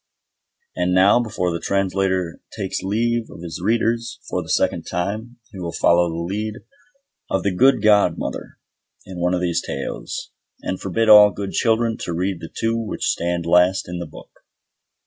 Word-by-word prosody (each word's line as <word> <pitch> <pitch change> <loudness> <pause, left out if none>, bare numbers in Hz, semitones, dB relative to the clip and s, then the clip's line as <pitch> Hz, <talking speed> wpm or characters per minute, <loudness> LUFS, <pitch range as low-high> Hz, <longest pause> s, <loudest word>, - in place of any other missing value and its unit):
And 90 0 0
now, 100 +5 +5
before 95 -7 -2
the 85 - -3
Translator 95 -2 -1 0.2
takes 95 -3 -3
leave 115 +4 -1
of 85 - -11
his 85 0 -6
readers 115 +2 0
for - - -2
the - - -11
second - - +1
time, 110 +7 -3
he 95 - -9
will 85 -2 -4
follow 85 +1 +3
the 85 +1 -4
lead 105 +3 -3 0.7
of 95 - 0
the 100 - 0
good 125 +3 +4
godmother 105 -1 +1 0.5
in 90 -1 -8
one 90 +1 +1
of 90 - -2
these 85 -1 0
Tales, - - -5 0.3
and 95 - -3
forbid 110 +4 0
all 105 -1 +9
good 100 0 -5
children 115 0 +1
to 85 - -4
read 90 +1 -1
the 80 - -8
two 115 0 -1
which 115 -2 -3
stand 85 0 -2
last 90 +2 +3
in 90 0 -5
the 85 - -5
book. - - -15
95 Hz, 170 wpm, -21 LUFS, 90-110 Hz, 0.7 s, all